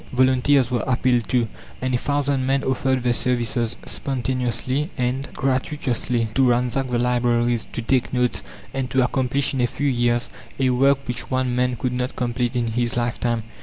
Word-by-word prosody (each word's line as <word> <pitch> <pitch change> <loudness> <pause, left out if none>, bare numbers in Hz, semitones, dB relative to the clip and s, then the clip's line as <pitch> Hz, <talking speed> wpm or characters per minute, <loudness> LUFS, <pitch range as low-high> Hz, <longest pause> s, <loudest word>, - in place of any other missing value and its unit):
Volunteers 130 0 +3
were 120 - 0
appealed 125 -2 +1
to, 120 -2 +2 0.3
and 130 0 -1
a - - +4
thousand 140 -1 0
men 135 +1 +1
offered 130 -1 0
their 120 -1 +2
services, 120 -1 0
spontaneously 130 +2 -2
and 130 +2 -1
gratuitously, 130 -3 0
to 130 0 +4
ransack 125 +2 +1
the 120 - 0
libraries, 120 -1 +1
to 120 - -4
take 130 +1 +1
notes, 125 -1 +1 0.3
and 135 -1 -2
to 130 -1 +3
accomplish 130 +2 0
in 130 - 0
a 120 - +3
few 145 +4 -2
years 120 -2 +1 0.3
a 130 -1 +2
work 135 +2 +2
which 125 +1 -3
one 130 -1 0
man 125 0 +1
could 125 +2 -2
not 125 +1 -2
complete 120 0 -1
in 120 -2 0
his 120 +1 -1
lifetime. 120 -1 -1
125 Hz, 170 wpm, -22 LUFS, 120-130 Hz, 0.3 s, a